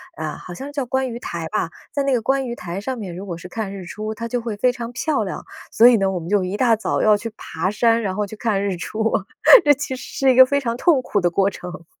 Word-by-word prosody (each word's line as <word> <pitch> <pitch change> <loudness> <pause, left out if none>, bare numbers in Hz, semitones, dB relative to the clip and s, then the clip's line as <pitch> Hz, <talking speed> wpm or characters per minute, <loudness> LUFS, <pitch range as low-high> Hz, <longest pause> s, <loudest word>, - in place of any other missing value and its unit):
啊， 155 -1 -4
好 - - -11
像 270 - -7
是 - - -8
叫 285 -2 -2
观 265 +1 -1
鱼 235 - -6
台 170 -7 -5
吧， 210 -5 -1 0.2
在 285 - -1
那 275 - 0
个 245 - +2
观 270 +3 0
鱼 235 - -4
台 180 0 -6
上 260 +3 -4
面， 190 -6 -6
如 185 - -7
果 170 - -5
是 170 - -10
看 200 +1 -4
日 190 -2 -8
出， 215 +3 -5
它 230 +1 -5
就 245 +1 -2
会 225 -3 -5
非 250 +4 +3
常 240 -1 -6
漂 270 -1 -1
亮。 190 - -6 0.3
所 230 - +6
以 245 - +7
呢， 195 -2 +1
我 185 - -2
们 165 - -8
就 205 -1 +2
一 185 +3 -3
大 235 -2 +4
早 220 - -1
要 215 -1 +5
去 225 +2 -5
爬 165 +4 -3
山， 230 +2 +2
然 190 -4 -2
后 210 +1 -1
去 210 +2 -9
看 210 -3 -1
日 195 -2 -1
出， 220 +5 -2 0.5
这 290 - +5
其 265 -1 -4
实 255 - -9 0.2
是 270 -1 +4
一 - - -2
个 260 - +10
非 280 +2 +1
常 235 -4 -2
痛 280 +2 +3
苦 205 - 0
的 175 - +2
过 195 +3 +1
程。 180 -2 -9
220 Hz, 310 characters per minute, -21 LUFS, 190-250 Hz, 0.5 s, 个